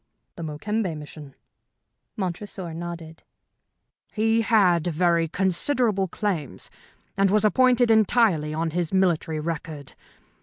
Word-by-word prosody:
"The - - -9
Mokembe 165 +3 -3
mission?" 150 -2 -11 0.8
Montresor 185 -2 -4
nodded. 165 -1 -7 0.9
"He 225 +1 +2
had 190 -8 +3
very 170 0 +2
considerable 195 - 0
claims, 175 -6 -4 0.4
and 195 0 +3
was 210 +2 +3
appointed 245 +1 +4
entirely 215 -8 +3
on 160 +1 -2
his 170 -1 -2
military 170 -4 +1
record. 155 -2 -5
180 Hz, 105 wpm, -24 LUFS, 160-210 Hz, 0.9 s, appointed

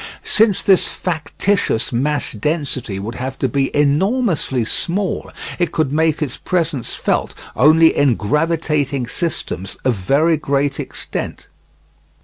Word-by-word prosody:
Since 210 -3 +3
this 190 -2 +4
factitious 170 - -1
mass 140 +3 0
density 130 - -2
would 105 +4 -5
have 130 +2 -5
to 135 - 0
be 135 +2 0
enormously 150 - +1
small, 185 - -2 0.3
it 175 - +1
could 155 -4 0
make 160 0 +2
its 135 -5 -5
presence 160 -9 -2
felt - - -1 0.2
only 160 +5 +5
in 140 -4 +3
gravitating 150 +1 0
systems 120 - -3
of 130 - +3
very 140 - +2
great 140 0 0
extent. - - -5
145 Hz, 125 wpm, -19 LUFS, 130-165 Hz, 0.3 s, only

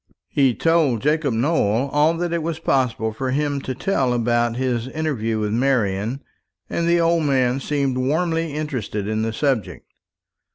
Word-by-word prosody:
He 135 -4 +2
told 160 -9 +2
Jacob 150 -4 +1
Nowell 120 -2 +1
all 150 +3 +3
that 175 0 -2
it 170 - 0
was 160 0 -3
possible 125 -7 0
for 130 +4 -3
him 145 +1 -1
to 130 -1 -4
tell 135 -6 0
about 120 0 +1
his 125 -2 -1
interview 130 -7 -2
with 105 -1 -1
Marian; 115 -1 0 0.4
and 170 - -1
the 170 0 +3
old 165 -1 +2
man 130 -2 +2
seemed 140 -3 -1
warmly 165 +4 0
interested 130 -9 -3
in 110 0 -1
the 110 0 -1
subject. 125 - -1
135 Hz, 160 wpm, -21 LUFS, 120-155 Hz, 0.4 s, all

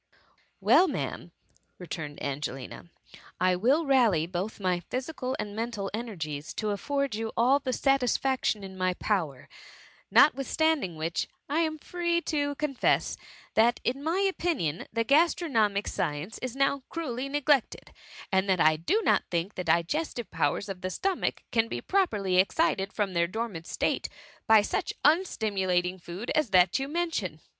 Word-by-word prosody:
Well, 375 - +5
Ma'am," 300 - -4 0.5
returned 155 -4 -6
Angelina, 140 +2 -5 0.5
I 185 0 +3
will 265 - +2
rally 235 - +3
both 185 +6 -4
my 185 -2 0
physical 255 0 -3
and 210 -1 -5
mental 225 -3 -3
ener 225 -2 -5
gies 150 -1 -5
to 215 -1 -1
afford 280 +5 -1
you 225 +1 -3
all 255 +4 +4
the 265 -2 -3
satisfaction 260 -4 +1
in 190 -1 -8
my 185 0 +1
power; 165 -13 -2 0.6
notwithstanding 285 - +3
which, 160 0 -2 0.2
I 295 +3 0
am 315 -1 0
free 345 +2 -1
to 285 -3 -1
confess, 280 -3 +1 0.4
that, 235 +2 +3
in 260 +3 -1
my 325 +4 0
opinion, 340 - -1
the 230 +1 0
gastronomic 240 - +2
science 150 +8 -3
is 255 -1 -5
now 275 0 +1
cruelly 275 -5 -4
neglected, 290 -2 +1 0.4
and 190 0 +2
that 185 -2 +3
I 155 0 +5
do 415 - 0
not - - +3
think 175 +4 -2
the 180 - -4
digestive 180 - 0
powers 200 - 0
of 190 -2 -6
the 185 - -2
sto* 385 - 0
mach - - -2
can 225 -1 +2
be - - -4
properly 210 - +1
excited 195 - +2
from 200 -3 -2
their 170 -1 +2
dor 225 +6 -2
mant 165 -6 -9
state - - -1 0.4
by 220 -2 +7
such - - -2
unstimulating 195 - +1
food 175 +7 -6
as 305 -6 +1
that 185 +3 +4
you 270 - -2
mention. 295 - -2
220 Hz, 155 wpm, -28 LUFS, 180-280 Hz, 0.6 s, by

